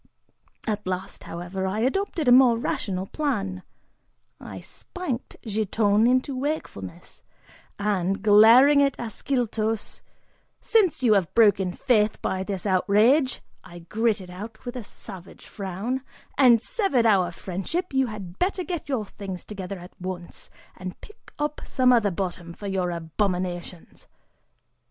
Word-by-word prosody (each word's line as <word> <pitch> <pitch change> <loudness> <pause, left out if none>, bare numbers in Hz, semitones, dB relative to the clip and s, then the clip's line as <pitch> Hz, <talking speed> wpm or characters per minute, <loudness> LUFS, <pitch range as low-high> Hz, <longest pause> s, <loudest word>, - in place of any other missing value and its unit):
At 210 -3 -2
last, 185 +1 -4
however, 175 +3 -4
I 205 +3 -1
adopted 330 - 0
a - - +6
more 245 -2 +7
rational 190 -5 -2
plan; 200 -9 -2 0.8
I - - -8
spanked 340 -10 -6
Giton 215 0 +2
into 255 +2 +1
wakefulness, 255 - -5 0.6
and, 195 -1 -1
glaring 230 +7 +7
at 275 -1 +2
Ascyltos, 225 -2 -2 0.6
"Since 400 - +2
you 225 -3 +5
have 190 -5 +1
broken 200 -5 +4
faith 215 0 +1
by 190 - -2
this 190 0 -4
outrage," 215 +9 +3 0.2
I 175 -2 -12 0.2
gritted 215 -5 0
out, 215 +6 -9
with 245 +1 -5
a 245 - -5
savage 185 -2 -11
frown, 200 +7 -4 0.3
"and 245 -4 +5
severed 395 - +1
our 195 -5 +4
friendship, 235 - -4
you 265 -1 +2
had 195 -5 -8
better 370 0 0
get 345 -5 -5
your 245 -6 -1
things 195 -2 -8
together 195 -2 -6
at 180 0 -12
once, 180 -2 -6 0.3
and 185 0 -7
pick 425 - -16
up 295 0 -2
some 255 -1 +3
other 225 -4 +3
bottom 175 -2 -4
for 205 - -10
your 190 -2 -1
abominations!" 175 +1 -3
210 Hz, 135 wpm, -25 LUFS, 185-255 Hz, 0.8 s, more